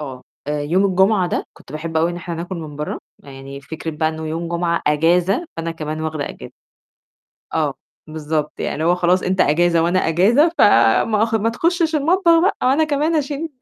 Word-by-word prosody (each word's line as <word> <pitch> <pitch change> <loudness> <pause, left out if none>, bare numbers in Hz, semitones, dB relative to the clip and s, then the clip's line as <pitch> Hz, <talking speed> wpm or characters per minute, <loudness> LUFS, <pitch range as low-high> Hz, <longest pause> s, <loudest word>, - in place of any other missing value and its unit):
آه، 130 -4 -7 0.3
يوم 150 +6 0
الجمعة 190 0 +2
ده - - -2
كنت - - -16
باحب 160 +1 -5
أوي 165 +2 +2
إن 175 - -6
إحنا 175 0 -6
ناكل 175 +2 -5
من 155 -3 -8
بَرّه، 150 +1 -4 0.2
يعني 135 0 -10
فكرة 160 +3 -6
بقى 155 +1 -1
إنه 160 0 -6
يوم 165 +2 -4
جمعة 170 0 -1
أجازة 175 - +2
فأنا 165 0 -3
كمان 155 -1 -5
واخدة 155 -2 -3
أجازة. - - -10 1.0
آه، - - 0 0.3
بالضبط، 155 -1 -3
يعني - - -2
اللي 155 +2 -2
هو 175 +1 +3
خلاص 180 +1 +1
أنت 185 +1 +1
أجازة 170 +2 +2
وأنا 180 +2 +2
أجازة 220 - +4
ف - - +3
ما 205 - +4
ما 225 +2 0
تخشش 330 +5 0
المطبخ 335 +3 +3
بقى 385 +4 +2
أو - - +3
أنا 290 +4 +3
كمان 305 +2 0
اشيل 295 +2 -2
170 Hz, 190 wpm, -19 LUFS, 155-220 Hz, 1.0 s, أجازة